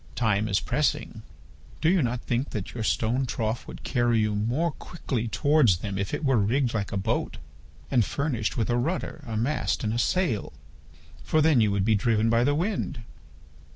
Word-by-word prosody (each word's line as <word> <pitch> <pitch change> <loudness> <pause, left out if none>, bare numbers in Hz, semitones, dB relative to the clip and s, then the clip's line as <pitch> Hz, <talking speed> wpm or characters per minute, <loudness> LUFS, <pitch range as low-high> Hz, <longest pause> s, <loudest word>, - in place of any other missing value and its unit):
Time 110 -3 +1
is 100 - +2
pressing. - - -1 0.6
Do 160 - +1
you 180 +1 +4
not 125 -1 -1
think 125 +3 -1
that 105 -4 -5
your 120 - -4
stone 120 +4 0
trough 115 +1 -2
would - - -9
carry 120 -2 +1
you 105 -1 +1
more 120 +11 0
quickly 130 -7 -4
towards 145 - +3
them 100 +1 -4
if 100 - -2
it 160 - -3
were 135 -4 +3
rigged 120 +5 +1
like 105 -3 -2
a - - -1
boat 95 - -1 0.5
and 125 -4 +4
furnished 125 -2 -2
with 115 +1 0
a 120 - +2
rudder, 155 +3 -2
a 110 -2 -3
mast, 135 +3 0
and 110 0 0
a 120 - -1
sail, 160 - 0 0.7
for 155 - +1
then 155 -5 +4
you 105 - +3
would 100 -1 0
be 110 - +3
driven 110 +1 +2
by 115 +1 +3
the 145 +3 +2
wind? 165 - -2
120 Hz, 190 wpm, -26 LUFS, 110-140 Hz, 0.7 s, you